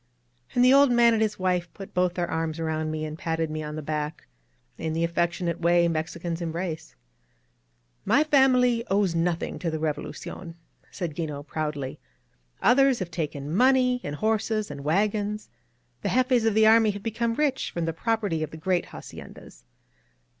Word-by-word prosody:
And 245 0 +5
the 255 - +7
old 280 -1 +6
man 235 -1 +5
and 220 - +1
his 215 -1 0
wife 180 -2 0
put 195 - -10
both 180 -1 +1
their 175 -1 -1
arms 160 -1 -2
around 160 -1 -2
me 155 0 -3
and 155 +1 -7
patted 160 -2 -2
me 155 0 -3
on 150 0 -5
the 155 - -5
back, 150 +1 -4 0.5
in 160 - -2
the 165 +1 0
affectionate 170 0 -1
way 170 0 +4
Mexicans 165 +1 -3
em 165 -1 -2
brace. 165 -1 -5 1.1
^^My 300 - +4
family 255 -5 +4
owes 195 -2 +2
nothing 170 0 -1
to 170 - -2
the 160 - -2
Revolucion," 160 +2 -5 0.3
said 170 -4 -4
'6ino, 150 -3 -4
proudly. 150 -3 -4 0.6
^^Others 270 0 +5
have 185 -5 -5
taken 150 -2 -4
money 250 +1 +4
and 145 - -4
horses 215 0 0
and 140 -1 -7
wagons. 205 +6 0 0.5
The - - -1
jefes 250 -2 +2
of 220 - +1
the 220 0 +5
army 220 0 +6
have 205 -1 -4
become 230 +1 -1
rich 285 -2 0
from 170 -1 -3
the 165 - -2
property 205 -3 -1
of 155 - -2
the 160 - -10
great 180 +2 0
haciendas. - - -12
175 Hz, 175 wpm, -26 LUFS, 160-220 Hz, 1.1 s, the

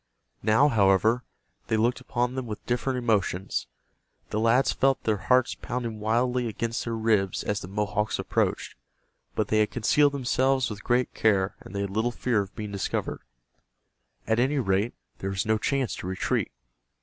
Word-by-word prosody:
Now, 110 +7 +4
however, 110 +1 +3 0.4
they 110 - +1
looked 120 +3 +1
upon 125 -1 -1
them 130 -2 -4
with 105 -1 -7
different 125 +2 -1
emotions. 100 -6 0 0.6
The 105 - 0
lads 115 +4 +3
felt 135 0 +2
their 110 -2 +1
hearts 130 -1 +4
pounding 115 -3 -4
wildly 120 +3 +1
against 115 +2 -2
their 115 -1 -2
ribs 110 -4 +1
as 105 0 -1
the - - -8
Mohawks 105 +2 -1
approached, - - -1 0.6
but 105 -1 0
they 110 - +3
had 105 - +3
concealed 145 +5 +3
themselves 130 -1 +1
with 105 -1 -7
great 125 +1 +1
care 100 -3 +2
and 100 - -11
they 100 - -1
had 100 -1 -3
little 110 +4 +1
fear 120 -2 0
of 100 0 -8
being 105 -2 -5
discovered. 100 -2 -3 1.0
At 110 +1 +1
any 135 +4 +2
rate 105 -1 +1 0.2
there 95 - -3
was 95 -1 -2
no 110 0 +2
chance 135 -2 0
to - - -6
retreat. 95 0 -1
110 Hz, 170 wpm, -27 LUFS, 105-125 Hz, 1.0 s, Now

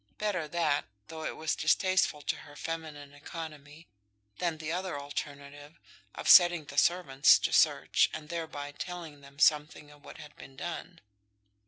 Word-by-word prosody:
Better 200 -7 -2
that, 155 -3 0 0.2
though 160 -1 -7
it - - -4
was 155 0 -1
distasteful 180 -2 +1
to - - -2
her 145 -1 -14
feminine 150 -3 -6
economy, 150 0 -10 0.5
than 170 -3 -1
the 155 0 -5
other 180 -3 -3
alternative 145 +1 -8 0.4
of - - -6
setting 175 -4 +7
the 140 0 -10
servants 150 -7 +4
to - - -2
search, - - +3
and 155 -1 -8
thereby 160 -4 -5
telling 160 -1 -8
them 140 0 -16
something 150 0 +2
of 145 0 -19
what - - -12
had 150 -1 -12
been 135 - -13
done. 175 +3 -7
155 Hz, 155 wpm, -30 LUFS, 145-170 Hz, 0.5 s, setting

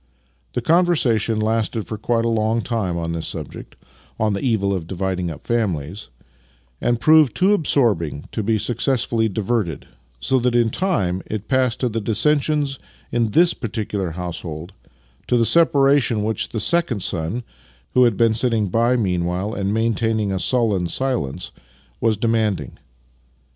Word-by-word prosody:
The 125 - -2
conversation 130 - +2
lasted 110 0 -1
for 110 - -5
quite 115 +2 0
a - - +2
long 115 0 0
time 100 -8 -2
on 85 0 -3
this 85 -1 -3
subject - - -7 0.2
— - - -30
on 110 -1 +1
the 100 - -2
evil 105 -6 +1
of 90 -4 -4
dividing 95 -1 -2
up 80 - -9
families 95 - -2 0.4
— 60 0 -37
and 120 -1 +1
proved 155 -1 +5
too 190 +3 +3
absorbing 105 - +1
to 110 - -2
be 110 +1 +1
successfully 115 0 0
diverted, 100 -5 -2 0.3
so 130 - +1
that 125 0 0
in 120 -2 +3
time 100 - 0
it 110 -1 -5
passed 130 -4 +1
to 125 - +2
the 115 0 -3
dissensions 145 +4 +1 0.3
in 120 -1 +1
this 170 +10 +4
particular 105 -4 -3
household 85 0 -6 0.3
— - - -35
to 125 - +2
the 115 - +3
separation 140 -7 +3
which 110 -1 -1
the 110 - -3
second 125 - +1
son 90 +7 -2 0.5
(who 125 0 +5
had 115 -5 +1
been 115 -1 +3
sitting 110 -3 +1
by 115 +5 +2
meanwhile 90 -1 -1
and 100 -2 -2
maintaining 110 -1 0
a 95 - -1
sullen 105 -6 +1
silence) 105 - -2 0.5
was 110 -2 +1
demanding. 105 - -1
110 Hz, 160 wpm, -21 LUFS, 95-120 Hz, 0.5 s, proved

